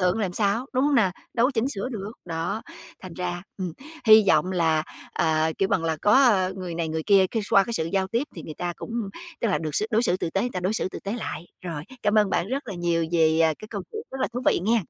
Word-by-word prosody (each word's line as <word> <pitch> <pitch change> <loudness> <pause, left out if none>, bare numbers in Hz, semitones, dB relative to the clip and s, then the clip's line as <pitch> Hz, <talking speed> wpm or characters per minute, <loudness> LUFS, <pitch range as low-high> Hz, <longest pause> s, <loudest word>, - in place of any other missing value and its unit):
thượng 180 +3 +2
làm 195 -5 -1
sao, 210 +6 0
đúng 260 +1 +2
hông 290 - +3
nè? 215 -7 +4 0.2
Đâu 235 0 +4
có - - 0
chỉnh 230 +2 +1
sửa 210 -3 -3
được, 215 -3 -5
đó, 170 +5 -3 0.4
thành 185 -2 -8
ra, 175 -1 -3 0.2
ừm, 180 -3 -3 0.3
hy 215 0 +9
vọng 160 +4 +3
là, 160 -3 +2 0.3
ờ, 160 0 +1
kêu 195 - +2
bằng 165 -4 +1
là, 160 -1 0
có, 205 - +4
ơ, 210 -9 +5
người 180 -2 -5
này 165 -1 -2
người 160 0 -2
kia 195 -2 +6
cái 225 -2 -1
x - - -9
qua 195 - +7
cái 235 - -5
sự 160 -8 0
giao 190 -1 +1
tiếp 230 +5 0
thì - - -6
người 155 - -8
ta 175 +2 -3
cũng - - -8 0.5
tức 230 - +1
là 190 - +1
được 155 -1 -4
xử 215 - +1
đối 225 +1 +3
xử 185 -7 +2
tử 170 - -3
tế, 195 - 0
người 245 - -1
ta 180 - -3
đối 185 +3 0
xử 220 - 0
tử - - -7
tế 200 - -4
lại. 175 -7 -5 0.2
Rồi, 165 -5 -4 0.2
cảm 210 0 +2
ơn 210 -2 +3
bạn 175 - 0
rất 270 -1 -3
là 200 - -4
nhiều 170 -1 0
vì, 160 -1 +4
à, 160 -1 +4
cái 215 - -10
câu 200 -3 -4
chuyện 435 0 -4
rất 265 - -6
là - - +1
thú 245 - -3
vị - - +4
nghen. 225 +1 +3
190 Hz, 285 wpm, -25 LUFS, 170-220 Hz, 0.5 s, hy